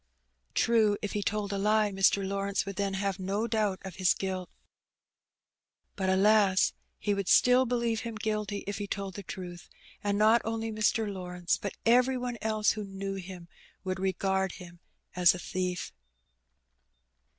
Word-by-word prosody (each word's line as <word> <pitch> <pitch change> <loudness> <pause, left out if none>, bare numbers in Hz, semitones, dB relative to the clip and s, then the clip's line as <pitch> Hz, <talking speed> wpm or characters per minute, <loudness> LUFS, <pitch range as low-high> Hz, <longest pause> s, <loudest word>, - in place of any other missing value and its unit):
True, 220 -3 +3
if 205 - -3
he 210 - -1
told 205 -1 -2
a 200 - -1
lie 210 +1 +2
Mr. 195 0 +2
Lawrence 200 0 -1
would 200 -1 -5
then 200 -1 -1
have 195 0 -2
no 195 +4 -1
doubt 215 -4 0
of 190 -2 -8
his 185 -2 +3
guilt. 185 -2 -4 1.5
But, 190 -1 -1
alas! 195 0 +4 0.2
he 205 - 0
would 200 -2 -2
still 250 +1 +5
believe 235 -2 0
him 230 -1 -5
guilty 215 -2 -2
if 200 0 -4
he 205 - -4
told 195 -1 -4
the 200 - -7
truth, 175 -2 -8 0.3
and 205 0 0
not 220 +3 +5
only 225 0 -3
Mr. 215 0 +1
Lawrence, 180 -3 -2
but 200 - -5
every 250 +3 +4
one 245 -2 -4
else 215 -1 +2
that 210 -1 -6
knew 195 0 -5
him 185 -2 -8 0.4
would 185 -1 -3
regard 190 0 0
him 175 -2 -12 0.4
as 180 0 +5
a - - -6
thief. 180 0 -3
200 Hz, 160 wpm, -29 LUFS, 190-215 Hz, 1.5 s, still